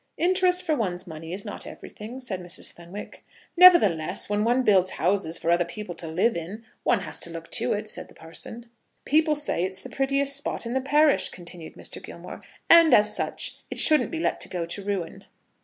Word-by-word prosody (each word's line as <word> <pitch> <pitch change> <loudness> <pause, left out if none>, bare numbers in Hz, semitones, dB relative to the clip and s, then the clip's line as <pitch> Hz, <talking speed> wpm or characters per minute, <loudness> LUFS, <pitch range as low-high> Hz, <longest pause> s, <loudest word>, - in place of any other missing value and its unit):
"Interest 365 +1 +2
for 315 -3 0
one's 185 -7 -2
money 160 -1 -9
is 195 +4 -3
not 205 - -6
everything," 225 +5 -10
said 215 -8 -5
Mrs. 180 0 -2
Fenwick. 175 +4 -10 0.3
"Nevertheless, 270 - +5
when 205 0 +1
one 245 +3 +2
builds 190 -5 +4
houses 175 -2 0
for 170 - -1
other 175 +1 +3
people 175 +2 -7
to 165 0 -7
live 180 +9 +1
in, 190 +7 -7 0.2
one 230 - +1
has - - -3
to - - 0
look 165 0 -9
to - - +1
it," 210 +1 -4
said - - -5
the - - -19
parson. 220 +8 -8 0.4
"People 310 +1 +3
say 290 -11 -1
it's 190 +1 -3
the - - -11
prettiest 275 +1 0
spot 285 -3 -3
in 235 - -4
the 265 - 0
parish," 295 +2 +3
continued 170 -2 -7
Mr. - - -6
Gilmore, - - -10 0.3
"and 335 -1 +7
as 210 0 +3
such - - -2
it - - -6
shouldn't 305 -1 +5
be 330 - -5
let 325 - +1
go 175 -2 -3
to 170 +4 -6
ruin." 195 -4 -4
210 Hz, 200 wpm, -25 LUFS, 175-275 Hz, 0.4 s, and